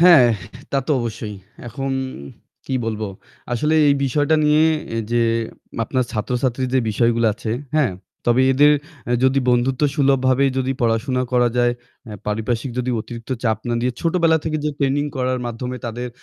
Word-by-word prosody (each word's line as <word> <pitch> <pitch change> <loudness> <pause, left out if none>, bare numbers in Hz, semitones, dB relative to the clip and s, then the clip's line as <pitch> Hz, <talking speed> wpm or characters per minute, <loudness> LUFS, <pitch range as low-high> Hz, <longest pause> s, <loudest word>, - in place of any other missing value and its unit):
হ্যাঁ, 170 -7 +8 0.5
তা - - 0
তো - - -2
অবশ্যই। 110 -2 -4 0.3
এখন 135 +3 -3 0.7
কি - - -5
বলবো? 110 -1 -2 0.5
আসলে 150 +6 +1
এই 140 - +5
বিষয়টা 145 +4 +2
নিয়ে 150 +1 +4 0.3
এ - - -1
যে 120 - +2 0.6
আপনার 130 +3 0
ছাত্রছাত্রীর 125 +3 0
বিষয়গুলো 115 +2 +2
আছে, 110 0 -5 0.2
হ্যাঁ? 135 -11 +3 0.3
তবে 120 +2 +4
এদের 145 +3 +6 0.4
এ - - +3
যদি 130 +1 +4
বন্ধুত্বসুলভভাবেই 135 +1 +2
যদি 130 0 0
পড়াশোনা 120 +2 +1
করা 125 -1 +4
যায়, 120 0 +3 0.3
অ্যা 105 - -7
পারিপার্শ্বিক 110 +4 -1
যদি 125 0 -1
অতিরিক্ত 115 +2 -9
চাপ 110 -2 +1
না 120 - 0
দিয়ে, 125 +1 0
ছোটবেলা 165 -1 +3
থেকে 155 -1 -1
যে 150 - +1
ট্রেনিং 140 +1 +1
করার 130 0 0
মাধ্যমে 125 +2 -4
তাদের 120 +2 -4
125 Hz, 150 wpm, -21 LUFS, 120-140 Hz, 0.7 s, হ্যাঁ